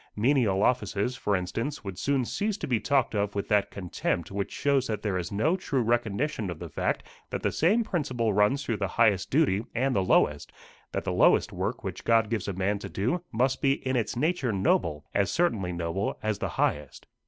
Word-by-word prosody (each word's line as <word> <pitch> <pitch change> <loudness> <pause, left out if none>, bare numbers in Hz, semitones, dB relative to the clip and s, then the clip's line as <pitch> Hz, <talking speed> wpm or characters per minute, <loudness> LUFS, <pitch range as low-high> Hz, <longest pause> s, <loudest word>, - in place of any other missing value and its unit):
Menial 110 -4 +2
offices, 120 -1 +1
for 105 -4 0
instance, 115 +10 -3
would 95 -3 -6
soon 135 -3 +1
cease 210 - -2
to - - -4
be 120 -4 +1
talked 135 -1 +1
of 105 -1 -1
with 100 - -2
that 105 -1 +3
contempt 90 -2 -3
which 100 0 -3
shows 140 -2 +1
that 110 -2 -3
there 105 -3 -1
is 90 -3 -3
no 130 - +2
true 140 -9 -1
recognition 120 0 0
of 85 - -5
the 85 -1 -8
fact - - -1 0.3
that - - -4
the - - +1
same 210 +9 +3
principle 130 - -1
runs 105 +8 +2
through 115 -4 -1
the 100 -1 -1
highest 105 -6 +3
duty 130 -9 +2
and 130 +2 +1
the 100 - +3
lowest 75 -5 +2 0.4
that - - -2
the - - -2
lowest - - +4
work - - -3
which - - -5
God 115 -1 +3
gives 110 -5 -1
a 100 - -2
man 100 +3 0
to - - -7
do 125 - -1
must 130 +3 +1
be 135 -1 +4
in 130 - +1
its 120 -1 -1
nature 145 -2 0
noble, 85 -6 +1
as 100 -1 +2
certainly 105 - 0
noble 85 +3 -2
as 110 -1 -1
the - - -2
highest. 75 -2 -1
110 Hz, 210 wpm, -27 LUFS, 100-135 Hz, 0.4 s, lowest